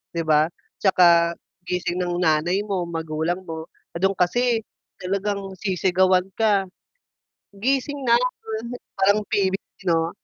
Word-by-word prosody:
'di 165 - 0
ba? 155 -1 +4 0.3
'Tsaka 170 -3 +5 0.3
gising 180 0 -2
ng 175 0 -1
nanay 170 +5 +2
mo, 190 -4 -2
magulang 165 +2 -2
mo 160 -2 -7 0.3
do'n 195 +3 +1
kasi 235 +7 +2 0.4
talagang 200 +2 -1 0.2
sisigawan 185 -1 +2
ka. 205 -3 +3 0.9
"Gising 270 +7 0
na!" 235 - +5 0.8
Parang 200 +2 +4
PBB 195 0 -2
'no? 165 0 +2
185 Hz, 110 wpm, -23 LUFS, 170-200 Hz, 0.9 s, Tsaka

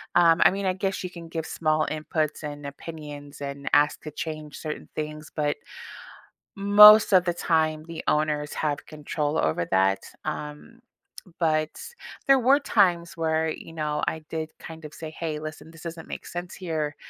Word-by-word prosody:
Um, 170 -1 +5
I - - +8
mean, 195 +1 -3
I 185 - +2
guess 190 +1 -2
you 185 - -3
can 170 -2 -10
give 165 -1 -4
small 155 -1 +1
inputs 155 0 -2
and 145 -1 -6
opinions 145 -1 -9
and 140 0 -5
ask 145 0 +4
to 155 - -6
change 155 0 -6
certain 155 -1 -6
things, 155 0 -5
but, 150 -1 0 1.1
most 210 +2 +9
of 185 -2 +6
the 175 - +1
time, 155 -2 +1
the 165 -1 -6
owners 150 -1 +1
have 150 -2 -2
control 150 0 -3
over 80 +2 +1
that. 95 +1 +3 0.2
Um, 150 +11 -6 0.6
but, 155 -2 +2 0.6
there 275 0 +6
were 265 +3 +4
times 175 -10 +2
where, 160 -1 +1
you 160 - -8
know, 150 -2 -2
I 160 - -3
did 160 -1 -3
kind 160 0 -10
of 150 - -12
say, 160 -1 -7
"Hey, 160 -2 -2
listen, 155 +1 -8
this 165 0 -14
doesn't 165 -1 -7
make - - -6
sense 175 0 -6
here. 155 -5 -3
155 Hz, 170 wpm, -26 LUFS, 150-170 Hz, 1.1 s, most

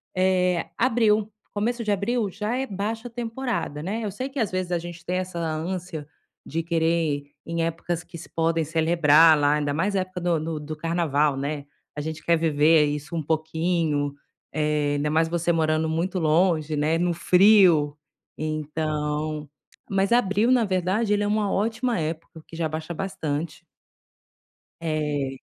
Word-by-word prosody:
eh, 180 -2 +2
abril, 220 -3 +2 0.2
começo 230 +3 -1
de 210 - 0
abril 205 +2 0
já 210 +5 -2
é 265 - -1
baixa 220 +2 -4
temporada, 230 - -3
né. 210 +6 -2
Eu 210 - -2
sei, 255 +8 -4
que, 275 0 -5
às 220 -5 +1
vezes, 185 -1 -3
a 175 - +2
gente 170 0 -9
tem 180 +1 -1
essa 185 -1 -4
ânsia 165 0 -3 0.4
de 165 +3 -3
querer 165 -1 0 0.3
ir 145 0 -10
em 165 0 -1
épocas 165 +1 -3
que 170 - -11
se 165 - -11
podem 165 0 +1
celebrar 160 0 +5
lá, 145 0 +3
ainda 145 -1 -1
mais 190 +7 0
época 185 -1 -2
do 170 -2 +1
do 155 0 -3
do 155 +1 -6
carnaval, 155 -3 +1
né. 140 +1 -3 0.3
A - - -5
gente 160 +1 -5
quer 170 0 +3
viver 155 -1 +4
isso 150 +3 -4
um 160 - -1
pouquinho. 160 -1 0 0.4
Eh, 150 -1 +1
ainda 145 +1 0
mais 160 +1 +3
você 170 +1 0
morando 160 -1 +1
muito 170 +4 -1
longe, 160 -1 +2
né, 155 +3 +2
no 175 +1 +1
frio, 180 -5 +5 0.4
então 155 -1 -2 0.4
mas, 195 +1 +1
abril, 230 0 +3
na 245 -3 +4
verdade, 190 +3 +1
ele 205 0 +1
é - - 0
uma 210 -1 +1
ótima 225 +4 0
época, 160 +1 -3
porque 165 - -13
já 165 - 0
abaixa 160 +2 -4
bastante. 160 -4 -4 1.2
É. 150 -4 -2
165 Hz, 165 wpm, -25 LUFS, 155-195 Hz, 1.2 s, celebrar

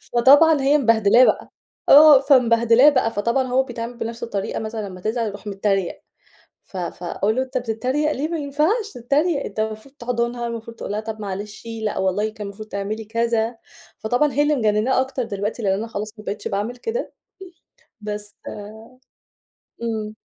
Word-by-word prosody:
فطبعًا 285 +5 +6
هي 280 +2 +4
مبهدلاه 230 -2 +5
بقى، - - 0 0.4
آه، 295 -1 +9
فمبهدلاه 245 -1 +5
بقى 255 -6 +1
فطبعًا 235 +4 0
هو 255 +1 +2
بيتعامل 240 -1 -7
بنفس 230 0 -5
الطريقة 205 -4 -3
مثلًا 220 -2 -5
لمّا 185 -1 -10
تزعل 225 +3 -1
يروح 205 0 -8
متريق، 195 -2 -1 0.6
ف 190 - -11
فأقول 180 +4 -2
له: 260 - +2
"أنت 260 0 -4
بتتريق 255 +6 -1
ليه 295 +2 -2
ما 335 - -2
ينفعش 310 - 0
تتريق، 280 +5 0
أنت 210 - -6
المفروض 220 +4 -4
تحضنها، 235 0 -2
المفروض 230 0 -7
تقول - - -6
لها 210 - -1
طب 220 0 -6
معلش، 205 +1 -6 0.2
لأ 215 - -2
والله 190 +3 0
كان 215 -2 -8
المفروض 210 +2 -9
تعملي 210 +2 -4
كذا." 230 +1 0 0.4
فطبعًا 245 +6 +1
هي 290 +4 +3
اللي 300 0 +2
مجنناه 220 +2 +2
أكتر 265 -1 -3
دلوقتي 210 +1 -4
لأن 195 -2 +2
أنا 210 +4 -3
خلاص، 215 -1 -5
ما - - -10
بقيتش 205 +1 -4
باعمل 215 +4 -3
كده. 455 - -4 0.9
بس 210 0 -6 1.5
إمم. 220 -2 -3
230 Hz, 165 wpm, -22 LUFS, 210-260 Hz, 1.5 s, آه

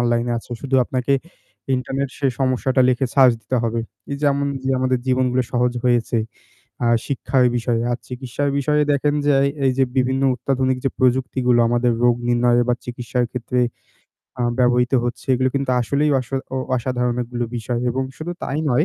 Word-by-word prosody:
অনলাইনে 120 0 +1
আছে। 115 - -14
শুধু 135 -1 -3
আপনাকে 130 +2 -1 0.6
ইন্টারনেট 135 +2 -2
সে 140 - +1
সমস্যাটা 130 0 +1
লিখে 130 +1 +2
সার্চ 130 -3 +7
দিতে 130 - -2
হবে। 115 0 -1 0.3
এই - - -2
যেমন 140 -1 +2 0.2
যে 135 - -1
আমাদের 130 -1 +1
জীবনগুলো 130 0 +2
সহজ 125 0 +2
হয়েছে, 120 -1 +2 0.7
আ - - +2 0.2
শিক্ষার 135 -2 +1
বিষয়ে 115 -1 0
আর 120 - -1
চিকিৎসার 130 +3 -3
বিষয়ে, 150 +2 +2
দেখেন 145 +1 +1
যে 145 - +4
এই - - +2 0.2
এই 130 - +4
যে 135 - +4
বিভিন্ন 130 +1 +1
অত্যাধুনিক 130 -1 0 0.2
প্রযুক্তিগুলো 125 -1 +2
আমাদের 120 +1 +2
রোগ 120 -1 +5
নির্ণয়ে 120 0 +3
বা 125 - +4
চিকিৎসার 125 0 -2
ক্ষেত্রে 125 0 -2 0.8
আ - - +1 0.2
ব্যবহৃত 125 0 +3
হচ্ছে, 120 +3 -4
এগুলো 130 +1 +1
কিন্তু 135 -1 0
আসলেই 140 +6 +1
অসো 130 +1 -5 0.2
ও - - -1 0.2
অসাধারণ 125 0 -1
অনেকগুলো 120 0 -3
বিষয় 120 +1 -2
এবং 130 +2 -1
শুধু 170 +3 -5
তাই 140 - -2
নয়। 150 +6 +3
125 Hz, 170 wpm, -21 LUFS, 120-135 Hz, 0.8 s, সার্চ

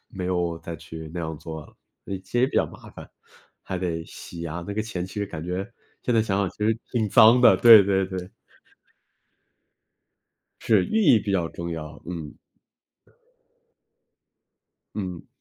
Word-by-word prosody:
没 90 -2 -5
有 85 -2 -1
再 85 0 -7
去 80 +1 -9
那 - - -4
样 80 -1 -5
做 80 0 -7
了， - - -19 0.5
其 120 - -3
实 130 - +5
比 - - -8
较 - - +3
麻 - - -13
烦， - - -12 0.5
还 95 - -4
得 85 -3 -3
洗 85 -1 -9
啊， 85 +2 -5
那 100 - -4
个 110 - -1
钱 95 -5 -4
其 95 - -13
实 105 - -1
感 80 -5 -7
觉 90 +3 -3 0.4
现 120 - 0
在 115 - +4
想 100 -3 -1
想 100 -3 0
其 - - -23
实 110 +2 +1
挺 110 -3 0
脏 115 +5 +7
的， 125 - +7
对 115 -3 +9
对 95 -1 +1
对。 95 -1 -6 2.3
是， 105 -5 +3
寓 220 0 +1
意 125 - +6
比 100 -1 -3
较 85 -4 0
重 85 0 -6
要， 75 -2 -7
嗯。 80 -4 -7 2.6
嗯。 90 -4 -5
90 Hz, 180 characters per minute, -25 LUFS, 85-105 Hz, 2.6 s, 对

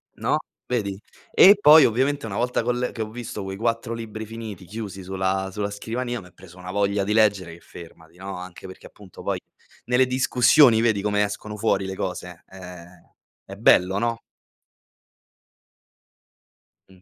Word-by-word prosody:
No, - - 0 0.3
vedi? 100 -6 -2 0.3
E 200 +2 +8
poi, 150 -1 +8
ovviamente, 135 +4 0
una 105 -3 -5
volta 125 +1 0
che - - -8
ho - - +3
l 125 0 -2
che 115 - -6
ho 110 - -8
visto 115 -2 -7
quei 95 0 -6
4 115 +2 -2
libri 110 -1 -7
finiti, 110 -4 -8
chiusi 100 0 -7
sulla 95 +1 -2
sulla 100 +1 -3
scrivania, 120 +4 -4
m'è 90 -1 -16
preso 90 0 -16
una 90 0 -8
voglia 100 0 0
di 105 +2 -1
leggere 100 -6 +2
che 85 - -13
fermati, 85 0 -14
no? 95 0 -7
Anche 90 0 -10
perché, 95 0 -11
appunto, 100 -4 -15
poi - - -2 0.5
nelle 125 +1 +3
discussioni 125 -1 +4
vedi 110 -4 +1
come 105 0 +1
escono 105 +1 -5
fuori 100 -2 0
le 95 - -5
cose? 90 -2 -6
Eh, 90 -1 -13 0.3
è 100 - -10
bello, 95 -2 +3
no? 115 0 -2 2.7
Mh. 95 -1 -20
105 Hz, 165 wpm, -23 LUFS, 95-115 Hz, 2.7 s, E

